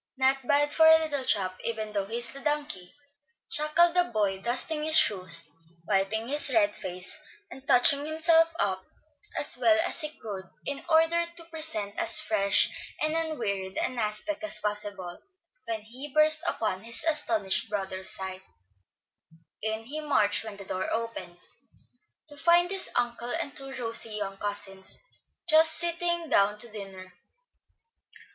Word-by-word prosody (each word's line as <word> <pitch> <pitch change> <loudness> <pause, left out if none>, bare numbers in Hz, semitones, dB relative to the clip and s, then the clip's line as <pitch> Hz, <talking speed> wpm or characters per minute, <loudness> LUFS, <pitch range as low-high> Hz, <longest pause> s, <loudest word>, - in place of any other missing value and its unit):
"Not 265 -1 +1
bad 290 +1 +2
for 320 -1 +5
a 320 0 +8
'little 295 -4 -2
chap,' 185 -4 0
even 220 -2 -4
though 200 -2 -2
he 225 +3 -4
is 240 +2 -1
'a - - -6
donkey,'" 290 -12 -2 0.6
chuckled 320 +3 +4
the 355 0 +3
boy, 205 -4 -2
dusting 260 +7 0
his 315 0 +6
shoes, 180 -5 +4 0.4
wiping 215 +4 -1
his 290 0 +1
red 205 -4 +2
face, 180 - -3 0.3
and 265 0 -11
touching 280 +4 +4
himself 325 +1 +3
up 190 -2 -1 0.5
as - - +4
well 330 -1 +4
as 345 - 0
he 305 - -2
could, 200 -4 -7 0.2
in 280 0 -4
order 325 +1 +3
to 335 - -6
present 310 -12 -3
as - - +5
fresh 210 -2 +2 0.3
and 310 0 0
unwearied 215 -13 -3
an 255 - -2
aspect 230 +9 -1
as 320 0 +3
possible, 205 -4 -3 0.4
when 225 -2 -4
he 255 +7 -8
burst 310 +1 +3
upon 215 - -2
his 230 +5 -2
astonished 230 -12 +1
brother's 190 -2 -5
sight. 190 0 -6 1.2
In 220 +1 -3
he 285 +7 -6
marched 250 -10 +1
when 215 -2 -9
the 200 - -10
door 185 0 -4
opened, 225 -6 -5 0.9
to 295 - -8
find 345 +3 +4
his 390 -1 +2
uncle 240 0 -2
and 275 - -2
two 270 0 -1
rosy 230 -3 0 0.2
cousins 200 -2 -3 0.5
just 320 0 +6
sitting 345 0 0
down 205 -5 +2
to 235 - -5
dinner. 195 -3 -10
235 Hz, 150 wpm, -27 LUFS, 200-310 Hz, 1.2 s, a